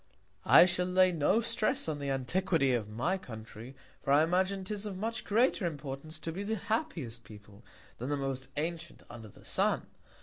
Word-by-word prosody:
I - - +9
shall 180 0 0
lay 185 0 +4
no 175 +7 +2
Stress 220 -5 0
on 155 -2 -2
the 140 -1 -3
Antiquity 135 +1 +1
of 110 -4 -1
my 140 - -1
Country; 115 - -10 0.3
for 140 - -1
I 145 +2 +6
imagine 190 +3 +1
'tis 210 +2 -4
of 195 -3 -5
much 225 +3 -3
greater 220 -3 +2
Importance 145 0 -6
to 165 - -3
be 185 +5 -5
the 215 +2 -1
happiest 175 - -3
People, 105 0 -14 0.4
than 125 +4 -4
the 145 - 0
most 135 -2 -3
antient 165 +2 -4
under 115 -2 -9
the 100 - -17
Sun. - - +1
160 Hz, 180 wpm, -31 LUFS, 130-190 Hz, 0.4 s, I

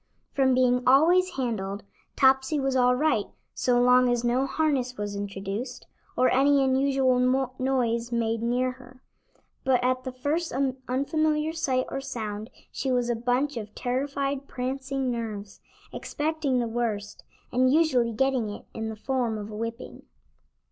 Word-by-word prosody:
From 265 -2 +3
being 250 -1 +3
always 345 +8 +5
handled, 205 -6 -3 0.3
Topsy 265 +2 +3
was 270 -1 0
all 250 -1 +4
right, 255 -7 +1 0.3
so 245 -1 +2
long 250 0 +5
as 245 -1 0
no 250 +3 +1
harness 270 -5 0
was 205 -1 -4
introduced, 200 +4 -5 0.3
or 255 - +4
any 275 +1 +4
unusual 265 -1 +2
noise 240 -3 0
made 230 -1 0
near 250 +2 +1
her; 255 0 -16 0.6
but 255 -2 +2
at 255 0 +1
the 260 - -4
first 290 +7 -2 0.4
unfamiliar 305 +4 0
sight 260 -5 0
or 270 - -4
sound 220 -5 -5 0.2
she 265 - -2
was 245 -1 +1
a - - 0
bunch 250 +4 0
of 215 -2 -7
terrified, 275 +2 -2
prancing 265 +1 -3
nerves, 215 -4 -5 0.3
expecting 300 -3 -1
the 240 -1 0
worst, 225 -3 -3 0.3
and 255 +1 +3
usually 265 -7 +3
getting 255 -1 0
it, 205 - -8
in 225 0 -4
the 220 - -5
form 240 -1 -1
of 210 0 -7
a - - -7
whipping. 230 +2 -6
255 Hz, 150 wpm, -26 LUFS, 235-270 Hz, 0.6 s, always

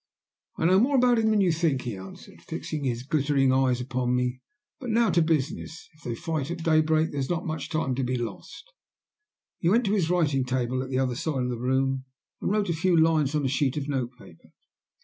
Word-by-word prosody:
"I - - -1
know 185 +3 +5
more 270 +6 +3
about 245 -2 +4
him 220 -1 +2
than 215 -2 +3
you 185 -3 +3
think," 160 -5 0
he 120 -4 -4
answered, 95 0 -12
fixing 150 -2 -5
his 120 -1 -2
glittering 140 -2 +2
eyes 130 -2 +2
upon 125 0 -1
me. 125 0 -1 0.4
"But 250 - -6
now 230 +1 +3
to 170 - +3
business. 160 0 -2
If 155 - -24
they 120 - -4
fight 155 +2 -3
at 170 -1 -5
daybreak 155 0 +3
there 145 - -3
is 135 - -2
not 175 -2 -1
much 160 -1 -4
time 155 -5 -1
to 130 +1 -1
be 125 0 -1
lost." 320 - -7 0.9
He 170 - +2
went 230 +5 +3
to 200 - +1
his 180 -6 +1
writing 150 -7 +2
table 130 0 -1
at 130 - -6
the 130 - -1
other 130 -1 +1
side 135 +1 -2
of 125 - -1
the 120 -2 -3
room 130 +1 0 0.4
and - - -1
wrote 205 -1 0
a - - +2
few 170 +1 +2
lines 155 -3 +3
on 150 -2 0
a - - +3
sheet 135 +1 0
of 145 -1 -3
note 130 -4 -1
paper. 85 -9 -17
145 Hz, 225 wpm, -26 LUFS, 130-170 Hz, 0.9 s, know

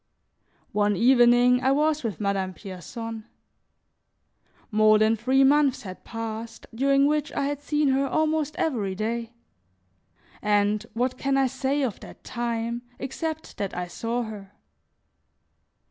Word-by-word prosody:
One 205 0 +2
evening 245 +2 +5
I 265 - +3
was 305 +1 +1
with 225 -4 -3
Madame 195 -2 -1
Pierson. 220 +4 -7 1.5
More 215 0 +5
than 215 +1 +3
three 260 +5 +3
months 280 -1 +3
had 185 -2 -9
passed, 225 0 -6
during 275 +3 +3
which 300 +1 0
I 280 - -1
had 290 0 -3
seen 295 -1 +1
her 270 +1 +2
almost 310 0 0
every 210 -11 -1
day; 230 +3 -3 1.1
and 210 0 +2
what 255 +2 -1
can 275 0 +1
I 270 - +4
say 265 +2 -1
of 235 -7 -2
that - - -13
time 235 0 -3 0.2
except 315 +4 -5
that 195 -3 -4
I 180 - -2
saw 230 +7 -3
her? 205 -3 -9
240 Hz, 130 wpm, -25 LUFS, 215-275 Hz, 1.5 s, evening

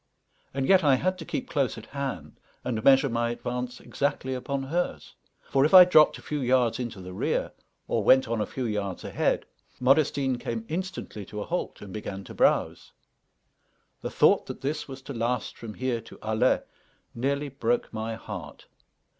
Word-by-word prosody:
And 135 0 -1
yet 190 -3 +6
I 140 -3 +5
had 185 +7 -1
to 160 - -7
keep - - -3
close 140 -9 0
at 110 - -9
hand 140 0 -5 0.2
and 115 -3 -2
measure 135 0 +6
my 120 -1 0
advance 125 +1 -4
exactly 135 -2 -2
upon 135 +2 -3
hers; 170 +6 -2 0.4
for 135 - +4
if 155 +6 +4
I 180 -1 +12
dropped 155 -4 +5
a - - -14
few 150 -1 -3
yards 125 -2 +2
into 120 -5 -4
the 90 0 -8
rear, - - -1 0.4
or - - 0
went 130 -2 +5
on 115 -1 -1
a - - -1
few 130 - -4
yards 105 -4 -3
ahead, - - 0 0.3
Modestine 135 -1 +2
came 115 -2 -4
instantly 180 - -5
to 105 0 -6
a - - -4
halt 180 +1 -3
and 95 -2 -9
began 100 -2 -5
to - - -10
browse. - - +1 1.1
The - - -3
thought - - +4
that - - -7
this 150 +3 -2
was 135 -1 -9
to 140 - -7
last 120 0 -2
from 110 -3 -8
here 125 -3 -1
to 115 - -14
Alais 110 +4 +2 0.5
nearly 140 +4 -1
broke 235 - -1
my 110 +1 -3
heart. 115 - -8
130 Hz, 180 wpm, -27 LUFS, 115-140 Hz, 1.1 s, I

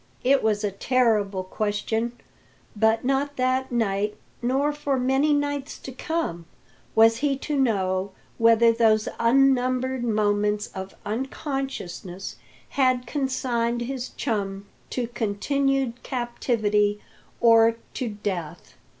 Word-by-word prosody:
It 275 +2 +4
was 215 -1 +1
a 205 - 0
terrible 210 -3 +1
question; 215 +4 -2 0.6
but 220 +2 +2
not 275 +2 0
that 255 +1 0
night, 210 -3 0 0.2
nor 270 +5 +1
for 285 -2 -1
many 265 +4 +2
nights 285 -1 -1
to 265 - -9
come, 260 - -3 0.5
was 225 +1 +6
he 280 +1 0
to 295 +2 -3
know 195 -7 +1 0.3
whether 230 0 +6
those 220 -2 +3
unnumbered 255 +1 +2
moments 210 -2 +1
of 190 0 -7
unconsciousness 240 - -4 0.3
had 255 -2 +2
consigned 245 -3 -1
his 255 0 -4
chum 200 -3 -3 0.2
to 250 - -2
continued 250 +3 -1
captivity 215 -5 0 0.4
or 230 -1 +6 0.2
to 250 - -3
death. 195 -6 -5
235 Hz, 110 wpm, -25 LUFS, 210-265 Hz, 0.6 s, was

